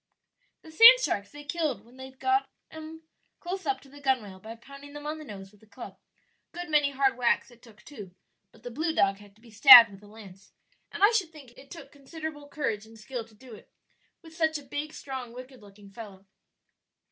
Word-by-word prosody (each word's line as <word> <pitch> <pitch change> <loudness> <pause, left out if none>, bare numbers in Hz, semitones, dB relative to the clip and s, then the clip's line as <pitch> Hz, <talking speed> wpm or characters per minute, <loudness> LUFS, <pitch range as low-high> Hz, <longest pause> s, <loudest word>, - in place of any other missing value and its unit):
"The 320 - -14
sand 460 +9 +8
sharks 205 - -3
they 295 0 -12
killed 300 -4 -4
when 245 +2 -20
they'd 260 0 -12
got 395 +1 0 0.2
'em 315 +1 -11 0.4
close 375 +2 -7
up 410 - -2
to - - -19
the 285 +1 -16
gunwale 235 -9 -2
by 220 +4 -10
pounding 275 +4 -14
them 295 0 -10
on 305 +1 -5
the - - -10
nose 195 -7 -11
with 210 - -25
a 220 - -22
club 200 - -12 0.5
a - - -16
good 350 -2 -7
many 295 -2 +3
hard 275 -1 0
whacks 245 +1 0
it 240 -1 -21
took, 220 -3 -19
too; 205 -11 -12 0.4
but 225 - -23
the 245 - -8
blue 315 +6 -3
dog 195 0 +1
had 205 -1 -18
to 220 - -27
be 235 - -17
stabbed 230 0 +9
with 195 0 -15
a 205 - -17
lance; 200 -3 -16 0.4
and - - -4
I 415 - +6
should 400 -8 -1
think 285 -6 -15
it 270 +3 -18
took 335 - -12
considerable 295 +1 -9
courage 225 -8 -4
and 225 0 -17
skill 235 +2 -7
to 220 -1 -23
do 250 +2 -15
it, - - -16 0.5
with 325 -1 -15
such 320 -2 0
a 290 - -12
big, 290 +3 -6
strong, 260 -5 -8
wicked 255 0 -12
looking 200 0 -17
fellow. 200 -3 -12
265 Hz, 220 wpm, -27 LUFS, 220-310 Hz, 0.5 s, stabbed